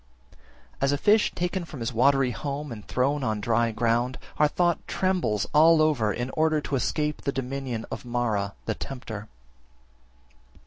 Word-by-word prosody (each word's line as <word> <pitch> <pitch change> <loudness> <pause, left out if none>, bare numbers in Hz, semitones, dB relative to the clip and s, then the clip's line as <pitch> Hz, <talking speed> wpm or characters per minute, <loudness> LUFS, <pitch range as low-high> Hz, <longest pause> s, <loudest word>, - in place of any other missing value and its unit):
34. - - -26 0.4
As 135 0 +3
a 145 - +1
fish 210 +8 +4
taken 180 +1 -1
from 155 -5 -9
his 115 +2 -3
watery 135 +2 +3
home 145 +2 -4
and 105 -3 -9
thrown 140 +3 0
on 110 -3 -1
dry 115 +2 +1
ground, 120 +3 0 0.2
our 150 - +6
thought 175 +2 +1
trembles 170 - 0
all 160 +2 +6
over 145 -9 +2
in 120 +4 -3
order 155 -1 +2
to 145 - -3
escape 150 +3 -1
the 140 - -1
dominion 135 -3 -4
of - - -5
Mara 115 -5 -1
(the 110 - 0
tempter). 110 -4 -7
135 Hz, 165 wpm, -26 LUFS, 115-150 Hz, 0.4 s, our